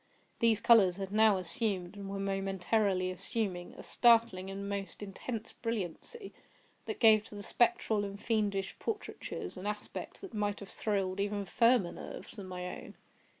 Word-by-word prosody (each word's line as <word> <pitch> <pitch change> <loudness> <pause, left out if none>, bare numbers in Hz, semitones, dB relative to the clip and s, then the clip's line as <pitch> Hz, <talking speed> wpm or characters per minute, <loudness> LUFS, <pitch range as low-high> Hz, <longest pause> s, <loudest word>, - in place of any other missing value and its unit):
These 230 -2 +3
colors 200 -7 +6
had 195 -1 -4
now 215 -1 +5
assumed, 185 +1 -1
and 200 -1 -7
were 195 - -3
momentarily 195 0 0
assuming, 185 -2 -3
a - - -9
startling 230 -6 +4
and 200 +1 -5
most 200 0 -4
intense 215 +3 -5
brilliancy, 230 - -4 0.5
that 435 - -4
gave 215 -2 +6
to 210 - -11
the 205 - -6
spectral 225 -3 +2
and 200 0 -5
fiendish 205 -4 0
portraitures 415 - -4
an 185 +3 -5
aspect 210 0 -5
that 390 -3 -9
might 205 -1 -1
have 200 - -9
thrilled 195 -3 -1
even 205 0 -1
firmer 230 -2 +3
nerves - - -8
than 195 -2 -7
my 180 -1 -5
own. - - -12
205 Hz, 155 wpm, -32 LUFS, 195-225 Hz, 0.5 s, colors